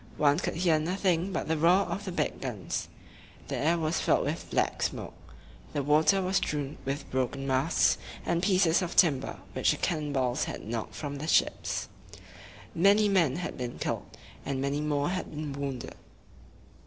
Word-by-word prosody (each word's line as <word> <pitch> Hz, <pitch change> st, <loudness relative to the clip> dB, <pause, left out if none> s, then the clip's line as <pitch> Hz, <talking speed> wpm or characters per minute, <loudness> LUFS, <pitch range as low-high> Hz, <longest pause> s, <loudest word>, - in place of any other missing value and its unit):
One 145 Hz, +1 st, +4 dB
could -, -, -2 dB
hear 165 Hz, -2 st, +3 dB
nothing 180 Hz, +2 st, 0 dB
but -, -, -2 dB
the 160 Hz, -1 st, 0 dB
roar 175 Hz, +5 st, +5 dB
of 205 Hz, -, -4 dB
the 185 Hz, -, -3 dB
big 155 Hz, -4 st, -2 dB
guns. 110 Hz, -10 st, -3 dB, 0.6 s
The -, -, -2 dB
air 165 Hz, +4 st, +2 dB
was 160 Hz, 0 st, 0 dB
filled -, -, +2 dB
with -, -, -3 dB
black -, -, 0 dB
smoke. -, -, -2 dB, 0.6 s
The 145 Hz, -, -1 dB
water 155 Hz, +7 st, +4 dB
was 190 Hz, +1 st, +1 dB
strewn 145 Hz, -1 st, -2 dB
with 140 Hz, +2 st, -3 dB
broken 130 Hz, +1 st, -1 dB
masts 135 Hz, +4 st, +2 dB, 0.3 s
and 170 Hz, 0 st, +1 dB
pieces 185 Hz, -3 st, +3 dB
of 180 Hz, -1 st, -3 dB
timber 140 Hz, -7 st, +3 dB, 0.2 s
which -, -, +2 dB
the -, -, +2 dB
cannon 155 Hz, -3 st, -1 dB
balls 130 Hz, 0 st, 0 dB
had -, -, -6 dB
knocked 115 Hz, 0 st, -4 dB
from 145 Hz, -2 st, -5 dB
the 155 Hz, -, -4 dB
ships. -, -, +1 dB, 0.9 s
Many 200 Hz, +4 st, +4 dB
men 170 Hz, -9 st, +3 dB
had 175 Hz, -4 st, -5 dB
been 125 Hz, -1 st, -4 dB
killed, -, -, -4 dB, 0.3 s
and 135 Hz, -1 st, -2 dB
many 140 Hz, +2 st, -1 dB
more 145 Hz, 0 st, 0 dB
had 185 Hz, 0 st, -3 dB
been 150 Hz, -1 st, -5 dB
wounded. 135 Hz, -3 st, -4 dB
155 Hz, 175 wpm, -29 LUFS, 140-175 Hz, 0.9 s, roar